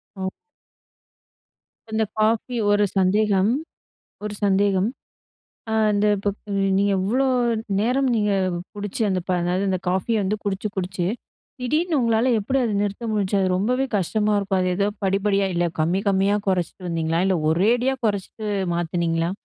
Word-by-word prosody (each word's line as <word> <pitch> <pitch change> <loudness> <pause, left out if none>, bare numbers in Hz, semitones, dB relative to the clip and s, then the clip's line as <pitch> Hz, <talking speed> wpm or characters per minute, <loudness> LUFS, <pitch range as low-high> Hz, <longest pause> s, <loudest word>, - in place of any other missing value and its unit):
ம். 190 0 -3 1.6
இந்த 220 0 +1 0.2
காஃபி 225 +3 +1 0.2
ஒரு 205 0 +4
சந்தேகம் 195 +2 +3 0.7
ஒரு 210 0 -4
சந்தேகம். 195 0 +2 0.8
ஆ - - -1 0.2
அந்த 205 +1 +2
இப்ப 200 +1 -2 0.5
நீங்க 200 0 +2
எவ்ளோ 240 +8 +1 0.5
நேரம் 260 +4 +1
நீங்க 210 -1 +1 0.4
குடிச்ச 205 +1 -5
அந்த 185 -2 0
ப - - 0
அ - - +1
என்னாது 180 +3 0
அந்த 185 -1 0
காஃபிய 200 +4 +1
வந்து 195 +2 0
குடிச்சு, 200 +1 -2
குடிச்சு 180 -1 -2 0.5
திடீர்னு 305 +5 +1
உங்களால 230 +1 +2
எப்டி 260 +7 0
அத 230 - 0
நிறுத்த 205 +3 -3
முடிஞ்சிச்சு? 200 -1 +1
அது 190 - +2
ரொம்பவே 250 +7 +1
கஷ்டமா 210 +3 0
இருக்கும், 195 -1 0
அது 185 - +1
ஏதோ 200 - +1 0.2
படிப்படியா 195 0 +1
இல்ல, 175 - +1 0.2
கம்மி 175 +5 +1
கம்மியா 195 +1 +2
குறச்சிட்டு 180 0 -1
வந்தீங்களா? 165 0 0
இல்ல 190 - +2
ஒரேடியா 235 +10 +2
குறச்சிட்டு 210 +1 -3 0.3
மாத்துனீங்களா? 170 0 0
200 Hz, 140 wpm, -23 LUFS, 185-215 Hz, 1.6 s, ஒரு